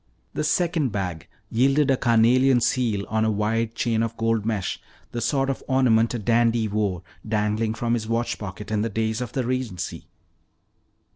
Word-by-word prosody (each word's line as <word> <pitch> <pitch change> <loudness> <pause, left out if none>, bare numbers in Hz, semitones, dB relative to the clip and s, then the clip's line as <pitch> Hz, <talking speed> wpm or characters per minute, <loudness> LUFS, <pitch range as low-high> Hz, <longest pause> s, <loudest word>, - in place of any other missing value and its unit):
The - - -2
second 165 -3 +1
bag 90 -6 -4 0.2
yielded 135 +4 +3
a - - +4
carnelian 125 +2 +4
seal 115 -5 0
on 110 0 0
a 110 - +2
wide 110 +2 -1
chain 115 -2 0
of 115 0 -2
gold 115 -1 0
mesh, 105 -5 -2 0.3
the 120 - -4
sort 135 +4 +1
of 135 - -2
ornament 120 -3 +3
a - - 0
dandy 115 0 +2
wore 100 -4 -1 0.2
dangling 110 +1 0
from 115 +1 -1
his 110 -2 -1
watch 115 +1 -1
pocket 105 +1 -7
in 105 -1 +1
the 115 - -1
days 110 +2 -1
of 120 -3 -5
the 130 -3 -1
Regency. 125 -8 -3
115 Hz, 170 wpm, -24 LUFS, 110-125 Hz, 0.3 s, a